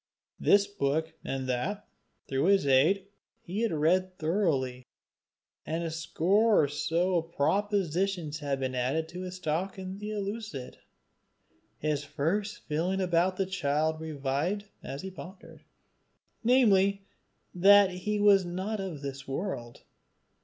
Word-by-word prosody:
This 200 Hz, 0 st, +5 dB
book 160 Hz, -5 st, -1 dB
and 135 Hz, -1 st, -3 dB
that, 130 Hz, +12 st, -2 dB, 0.4 s
through 135 Hz, +2 st, 0 dB
his 195 Hz, -4 st, +4 dB
aid, 150 Hz, +9 st, +4 dB, 0.4 s
he 195 Hz, +6 st, -3 dB
had 230 Hz, -, +1 dB
read 180 Hz, +4 st, +1 dB
thoroughly; 155 Hz, -8 st, 0 dB, 0.8 s
and 165 Hz, +2 st, -3 dB
a 165 Hz, -, -3 dB
score 185 Hz, +6 st, +3 dB
or -, -, +2 dB
so 170 Hz, +5 st, 0 dB
of 165 Hz, 0 st, -3 dB
propositions 185 Hz, -2 st, 0 dB
had 140 Hz, -2 st, -2 dB
been 130 Hz, -1 st, -2 dB
added 130 Hz, +6 st, 0 dB
to 180 Hz, +1 st, -7 dB
his 185 Hz, 0 st, -6 dB
stock 185 Hz, +3 st, -2 dB
in 190 Hz, +1 st, -6 dB
Euclid. 210 Hz, -, -5 dB, 1.0 s
His 150 Hz, 0 st, -1 dB
first 165 Hz, +9 st, -2 dB
feeling 170 Hz, +5 st, -1 dB
about 180 Hz, 0 st, +1 dB
the 195 Hz, -, +1 dB
child 155 Hz, -3 st, 0 dB
revived 155 Hz, +6 st, -2 dB, 0.2 s
as 140 Hz, -, -6 dB
he 190 Hz, -, -5 dB
pondered 185 Hz, +1 st, -11 dB, 0.8 s
namely, 200 Hz, -5 st, +4 dB, 0.5 s
that 200 Hz, +2 st, +6 dB
he 205 Hz, +4 st, -2 dB
was 200 Hz, -2 st, +6 dB
not 190 Hz, +5 st, -3 dB
of 175 Hz, -7 st, -5 dB
this 135 Hz, -1 st, -6 dB
world. 135 Hz, -5 st, -5 dB
175 Hz, 130 wpm, -29 LUFS, 150-195 Hz, 1.0 s, that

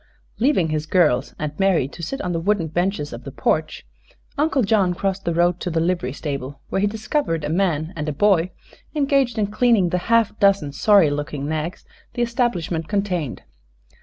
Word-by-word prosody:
Leaving 225 Hz, -, +2 dB
his 155 Hz, 0 st, -2 dB
girls 150 Hz, -8 st, +2 dB
and 150 Hz, -1 st, -3 dB
Mary 190 Hz, -9 st, +3 dB
to 155 Hz, -, -11 dB
sit 220 Hz, +12 st, -4 dB
on 180 Hz, -, -2 dB
the 165 Hz, -, -1 dB
wooden 195 Hz, 0 st, +1 dB
benches 175 Hz, -3 st, -1 dB
of 120 Hz, +2 st, -8 dB
the -, -, -7 dB
porch -, -, -1 dB, 0.5 s
Uncle 290 Hz, -3 st, +1 dB
John 195 Hz, -4 st, +2 dB
crossed 195 Hz, +1 st, -2 dB
the 170 Hz, -, 0 dB
road 175 Hz, +1 st, +2 dB
to 180 Hz, -, -3 dB
the 165 Hz, -1 st, 0 dB
livery 170 Hz, -6 st, 0 dB
stable, 140 Hz, -1 st, -5 dB
where 195 Hz, -, 0 dB
he 205 Hz, -, +3 dB
discovered 215 Hz, -, -2 dB
a 150 Hz, -, -2 dB
man 165 Hz, -1 st, 0 dB
and 155 Hz, -1 st, -3 dB
a -, -, -1 dB
boy 185 Hz, +2 st, +3 dB, 0.5 s
engaged 275 Hz, -5 st, +2 dB
in 215 Hz, -, +2 dB
cleaning 210 Hz, -2 st, +2 dB
the 180 Hz, -, 0 dB
half 230 Hz, -3 st, +3 dB
dozen 195 Hz, -8 st, +3 dB
sorry 195 Hz, 0 st, +4 dB
looking 145 Hz, -1 st, -3 dB
nags 155 Hz, +3 st, -4 dB, 0.3 s
the 240 Hz, -, +1 dB
establishment 190 Hz, -9 st, -1 dB
contained. 185 Hz, -, -2 dB
180 Hz, 185 wpm, -22 LUFS, 155-205 Hz, 0.5 s, sorry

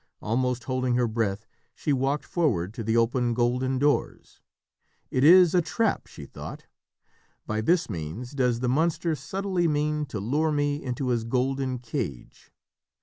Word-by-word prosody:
Almost 125 Hz, +2 st, -1 dB
holding 130 Hz, -1 st, 0 dB
her 125 Hz, -1 st, +2 dB
breath, 110 Hz, -2 st, -2 dB, 0.3 s
she 150 Hz, -, -1 dB
walked 135 Hz, +2 st, 0 dB
forward 110 Hz, -, 0 dB
to 115 Hz, -, -5 dB
the 110 Hz, +2 st, +1 dB
open 120 Hz, +1 st, +1 dB
golden 125 Hz, +2 st, +1 dB
doors. 145 Hz, +2 st, -1 dB, 0.7 s
"It 130 Hz, -, +1 dB
is 175 Hz, +2 st, +7 dB
a 180 Hz, -, +4 dB
trap," 210 Hz, +7 st, -1 dB
she -, -, -10 dB
thought. -, -, -9 dB, 0.8 s
"By 110 Hz, 0 st, -2 dB
this 170 Hz, +9 st, +2 dB
means 90 Hz, -, -6 dB
does 125 Hz, -4 st, 0 dB
the 125 Hz, -, 0 dB
monster 160 Hz, +5 st, +1 dB
subtly 180 Hz, +5 st, -1 dB
mean 150 Hz, 0 st, 0 dB
to 110 Hz, -, -5 dB
lure 145 Hz, +10 st, 0 dB
me 145 Hz, 0 st, 0 dB
into 125 Hz, 0 st, -2 dB
his 120 Hz, -2 st, +1 dB
golden 130 Hz, +2 st, -1 dB
cage." 120 Hz, -, -6 dB
130 Hz, 150 wpm, -26 LUFS, 120-150 Hz, 0.8 s, is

